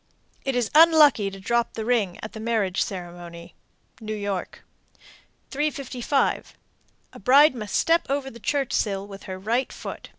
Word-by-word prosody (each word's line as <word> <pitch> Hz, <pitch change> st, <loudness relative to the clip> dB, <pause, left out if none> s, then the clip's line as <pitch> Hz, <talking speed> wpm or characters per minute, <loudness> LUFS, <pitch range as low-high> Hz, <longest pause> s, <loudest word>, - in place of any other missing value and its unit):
It 270 Hz, -1 st, -1 dB
is 245 Hz, -3 st, 0 dB
unlucky 305 Hz, -9 st, +6 dB
to 195 Hz, 0 st, -10 dB
drop 235 Hz, +4 st, 0 dB
the 220 Hz, -, -4 dB
ring 220 Hz, -7 st, 0 dB
at 215 Hz, -, -7 dB
the 220 Hz, -, -8 dB
marriage 220 Hz, -5 st, 0 dB
ceremony. 175 Hz, -2 st, -7 dB, 0.5 s
New 215 Hz, -1 st, -5 dB
York. 200 Hz, -3 st, -4 dB, 0.9 s
355. 275 Hz, -2 st, -1 dB, 0.6 s
A -, -, -11 dB
bride 280 Hz, +4 st, +6 dB
must 210 Hz, -5 st, -5 dB
step 335 Hz, +1 st, +2 dB
over 275 Hz, -1 st, -2 dB
the 235 Hz, -, -12 dB
church 275 Hz, +2 st, -1 dB
sill 195 Hz, -2 st, -1 dB
with 200 Hz, -1 st, -11 dB
her 185 Hz, -1 st, -6 dB
right 230 Hz, +7 st, -1 dB
foot. -, -, -8 dB
225 Hz, 155 wpm, -24 LUFS, 195-270 Hz, 0.9 s, unlucky